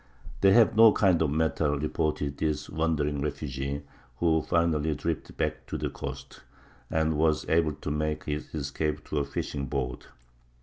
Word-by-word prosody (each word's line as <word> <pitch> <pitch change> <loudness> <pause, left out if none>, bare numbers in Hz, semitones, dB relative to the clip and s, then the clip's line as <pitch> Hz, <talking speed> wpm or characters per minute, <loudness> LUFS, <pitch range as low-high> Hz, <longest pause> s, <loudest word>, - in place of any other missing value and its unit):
"They 95 - +6
have 115 -1 +5
no 110 0 +8
kind 90 -5 +3
of 80 - +2
metal," 75 -1 +1
reported 75 -1 -1
this 75 -2 -1
wandering 75 -3 0
refugee, 70 -1 -3 0.3
who 80 0 +2
finally 80 -2 +1
drifted - - -4
back - - -2
to - - -3
the - - -3
coast, 65 0 -7 0.5
and 80 0 +1
was 80 -1 +2
able 80 -2 +2
to 75 - -5
make 75 +1 -1
his 75 0 -4
escape 75 +1 -2
to 75 - 0
a - - +1
fishing 70 0 -4
boat. 65 -1 -3
75 Hz, 160 wpm, -28 LUFS, 70-80 Hz, 0.5 s, no